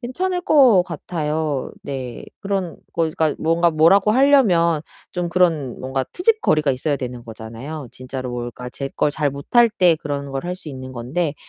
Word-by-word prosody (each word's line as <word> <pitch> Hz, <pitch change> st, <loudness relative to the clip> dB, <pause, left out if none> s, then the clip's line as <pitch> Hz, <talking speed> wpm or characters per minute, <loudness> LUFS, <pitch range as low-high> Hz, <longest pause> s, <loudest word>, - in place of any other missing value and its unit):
괜찮을 360 Hz, +9 st, -2 dB
것 260 Hz, -, +5 dB
같아요. 155 Hz, -4 st, -3 dB
네. 130 Hz, -4 st, -6 dB, 0.2 s
그런 195 Hz, -4 st, -2 dB, 0.2 s
그러니까 160 Hz, -2 st, 0 dB
뭔가 165 Hz, +2 st, +2 dB
뭐라고 165 Hz, +6 st, +4 dB
하려면 210 Hz, -, +4 dB, 0.3 s
좀 175 Hz, -1 st, -2 dB
그런 165 Hz, -7 st, +1 dB
뭔가 130 Hz, +1 st, -2 dB
트집거리가 355 Hz, -, +2 dB
있어야 140 Hz, +3 st, -1 dB
되는 125 Hz, -2 st, -6 dB
거잖아요. 115 Hz, +6 st, -8 dB
진짜로 130 Hz, 0 st, -6 dB
뭘 120 Hz, 0 st, -4 dB
그러니까 125 Hz, +1 st, -8 dB
제 135 Hz, +2 st, -5 dB
걸 145 Hz, -, +2 dB
잘 150 Hz, -1 st, 0 dB
못할 230 Hz, -, +3 dB
때 180 Hz, -6 st, +4 dB
그런 140 Hz, -1 st, -4 dB
걸 135 Hz, +4 st, -3 dB
할 180 Hz, +1 st, -3 dB
수 175 Hz, -, -10 dB
있는 130 Hz, -2 st, -8 dB
건데 140 Hz, +6 st, -2 dB
155 Hz, 335 characters per minute, -21 LUFS, 135-180 Hz, 0.3 s, 것